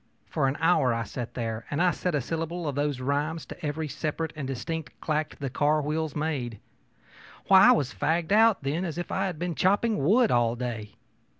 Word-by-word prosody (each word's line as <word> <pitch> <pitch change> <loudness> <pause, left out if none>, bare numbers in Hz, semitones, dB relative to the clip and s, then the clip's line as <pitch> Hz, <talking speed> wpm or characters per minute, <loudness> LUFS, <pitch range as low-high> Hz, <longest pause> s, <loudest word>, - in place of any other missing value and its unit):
For 145 -4 0
an 135 - -1
hour 155 -7 +3
I 115 - -1
sat 120 +3 -6
there 115 -2 -4
and 145 - -2
set 180 -4 -2
a 145 - +1
syllable 165 +4 -3
of 145 - -1
those 145 -1 -1
rhymes 145 +5 -1
to - - -11
every 155 +1 -2
separate 155 +2 -3
and 145 -4 -4
distinct 155 +5 -5
clack 155 0 -2
the 135 -3 -4
car 150 +3 +2
wheels 155 +1 -2
made. 140 -8 -2 0.9
Why, 190 0 +8
I - - +9
was 140 -4 0
as - - -21
fagged 165 +2 0
out, 220 -4 +5
then, 150 +6 -1
as 170 -3 -4
if 175 - -4
I 190 +1 0
had 180 -4 -5
been 175 +1 -2
chopping 200 +1 +2
wood 220 - +4
all 120 -1 +2
day. 115 -4 -5
150 Hz, 205 wpm, -27 LUFS, 135-165 Hz, 0.9 s, I